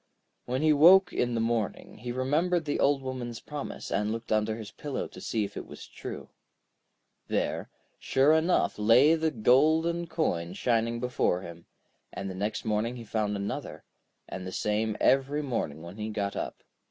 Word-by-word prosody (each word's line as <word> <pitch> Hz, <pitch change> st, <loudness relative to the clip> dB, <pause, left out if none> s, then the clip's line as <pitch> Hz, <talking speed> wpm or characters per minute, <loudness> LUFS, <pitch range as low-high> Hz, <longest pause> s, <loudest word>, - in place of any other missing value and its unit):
When 130 Hz, +4 st, -1 dB
he 155 Hz, -1 st, +5 dB
woke 180 Hz, +6 st, +7 dB
in 120 Hz, -1 st, 0 dB
the -, -, 0 dB
morning, 115 Hz, -3 st, -2 dB
he 120 Hz, +2 st, -5 dB
remembered 155 Hz, +7 st, +1 dB
the 145 Hz, -, -1 dB
Old 140 Hz, -1 st, +2 dB
Woman's 125 Hz, -3 st, -5 dB
promise, 150 Hz, -1 st, -7 dB
and 105 Hz, +1 st, 0 dB
looked 115 Hz, +1 st, -5 dB
under 110 Hz, 0 st, +1 dB
his 110 Hz, -2 st, -8 dB
pillow 145 Hz, +2 st, -4 dB
to -, -, -12 dB
see 110 Hz, -2 st, -1 dB
if 100 Hz, 0 st, -6 dB
it -, -, -6 dB
was -, -, -10 dB
true. -, -, -8 dB, 1.0 s
There, -, -, -1 dB, 0.3 s
sure 135 Hz, +3 st, +3 dB
enough, 160 Hz, -6 st, +2 dB
lay 120 Hz, +9 st, +6 dB
the 160 Hz, -1 st, +1 dB
golden 155 Hz, +8 st, +3 dB
coin 90 Hz, -, -1 dB
shining 115 Hz, +2 st, 0 dB
before 125 Hz, -7 st, 0 dB
him, 85 Hz, -1 st, -10 dB, 0.4 s
and 95 Hz, 0 st, -5 dB
the -, -, -6 dB
next 105 Hz, +5 st, -3 dB
morning 110 Hz, +3 st, 0 dB
he 120 Hz, -, -8 dB
found 105 Hz, -2 st, -1 dB
another, 100 Hz, 0 st, -5 dB, 0.4 s
and 90 Hz, 0 st, -6 dB
the -, -, -5 dB
same 105 Hz, +2 st, -1 dB
every 135 Hz, +3 st, +2 dB
morning 80 Hz, -, -3 dB
when 85 Hz, +4 st, -9 dB
he 110 Hz, 0 st, -4 dB
got 100 Hz, -2 st, -2 dB
up. -, -, -5 dB
120 Hz, 175 wpm, -28 LUFS, 105-145 Hz, 1.0 s, woke